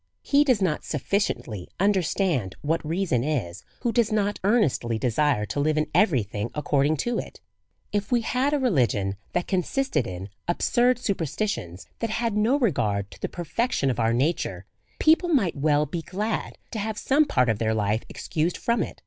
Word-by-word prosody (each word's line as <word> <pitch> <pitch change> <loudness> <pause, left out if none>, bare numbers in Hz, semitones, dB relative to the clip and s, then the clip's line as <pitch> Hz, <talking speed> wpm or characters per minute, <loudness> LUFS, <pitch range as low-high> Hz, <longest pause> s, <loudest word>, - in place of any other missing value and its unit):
He 285 +1 +4
does 250 -9 +2
not 155 -5 0
sufficiently 140 - -2
understand 180 - +1
what 160 +3 0
reason 160 -5 0
is^ 120 - -2 0.2
who 240 - +1
does 225 -1 +2
not 205 -1 0
earnestly 170 - +2
desire 125 -1 +1
to 105 +7 -3
live 155 +2 +1
in 155 0 0
every 160 - +4
thing 105 +2 -4
ac 150 - -3
cording 145 +2 +2
to 240 -1 0
it. - - -8 0.5
If 205 +1 -2
we 240 -1 +3
had 255 +5 0
a 295 - +2
religion 120 - +1 0.2
that 175 - 0
consisted 195 - 0
in 95 +2 -6 0.2
absurd 240 +8 +2
super 200 -8 -1
stitions, 115 - -3
that 230 - -1
had 230 0 -1
no 220 +6 +3
regard 105 - 0
to 85 - -14
the - - -2
perfection 175 - -1
of 120 - -4
our 115 0 +2
nature, 135 +9 -1 0.3
people 325 +3 +4
might 230 - +2
well 150 +1 +2
be 165 +4 -4
glad 210 +6 -3
to 220 - -3
have 215 +1 -3
some 285 +7 +3
part 125 - +2
of 110 -3 +1
their 110 -1 +1
life 105 +1 +1
excused 165 +3 -2
from 235 0 0
it. - - -5
170 Hz, 185 wpm, -25 LUFS, -, 0.5 s, He